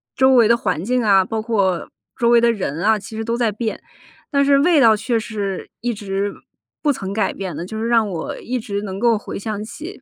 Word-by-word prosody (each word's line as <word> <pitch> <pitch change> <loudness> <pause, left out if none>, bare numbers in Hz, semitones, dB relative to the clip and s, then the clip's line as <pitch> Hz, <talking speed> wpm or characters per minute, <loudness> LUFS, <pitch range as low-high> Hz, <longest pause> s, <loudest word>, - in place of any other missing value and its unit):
周 265 +1 +4
围 230 -3 +6
的 235 - +5
环 185 -8 -2
境 250 +1 +1
啊， 195 -3 +4
包 220 +2 -3
括 200 -6 0 0.3
周 235 -2 +2
围 235 0 +6
的 235 0 +3
人 175 -6 -3
啊， 220 +1 +3
其 215 +2 -9
实 225 - -3
都 230 +1 -1
在 235 -3 +1
变。 220 +2 -4 0.5
但 280 0 +3
是 280 0 +5
味 325 +1 +4
道 225 -4 +6
却 230 +2 -1
是 205 -4 -4
一 240 0 -1
直 200 -1 -3 0.5
不 290 -2 +2
曾 195 -4 -5
改 215 - 0
变 190 -3 -5
的， 170 - -4
就 220 +4 -7
是 230 - -1
让 230 -3 +3
我 165 -3 -5
一 255 +1 -3
直 205 -4 -4
能 190 -1 -5
够 230 0 +3
回 210 - -7
想 210 0 -4
起， 325 - -9
220 Hz, 250 characters per minute, -20 LUFS, 200-235 Hz, 0.5 s, 围